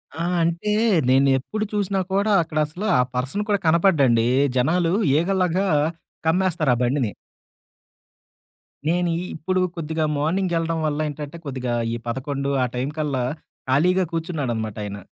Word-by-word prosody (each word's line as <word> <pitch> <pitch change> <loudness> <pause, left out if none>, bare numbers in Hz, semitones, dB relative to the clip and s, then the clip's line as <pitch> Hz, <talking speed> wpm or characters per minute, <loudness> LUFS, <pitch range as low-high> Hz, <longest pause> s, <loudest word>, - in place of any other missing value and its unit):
ఆ! 165 +1 -2 0.2
అంటే, 170 +6 0 0.4
నేను 135 +1 +4
ఎప్పుడు 215 +11 -4
చూసినా 200 -1 0
కూడా 200 +2 +2
అక్కడ 155 -1 -5
అసల 160 +7 -8 0.2
ఆ - - +6
పర్సన్ 135 +12 -2
కూడా 205 - +2
కనపడ్డండి. 150 -9 +4 0.3
జనాలు 165 +6 +2 0.2
ఈ‌గలాగా 185 +3 +1 0.6
కమ్మేస్తారు 165 -5 +2
ఆ - - -4
బండిని. 125 -3 0 1.8
నేను 175 +1 +1
ఇ - - -3
ఇప్పుడు 185 +4 -1
కొద్దిగా 160 -1 -2
మార్నింగ్ 175 +5 0
వెళ్ళడం 165 0 -1
వల్ల 150 0 -1
ఏంటంటే, 150 +2 -7
కొద్దిగా 130 -3 -3 0.2
ఈ - - -1
11 140 +3 -2
ఆ - - +3
టైం 125 +3 -1
కల్లా 140 -5 -1 0.5
ఖాళీగా 180 +8 +3
కూర్చున్నాడనమాట 135 - -3
ఆయన. 100 0 -5
160 Hz, 135 wpm, -23 LUFS, 135-180 Hz, 1.8 s, ఆ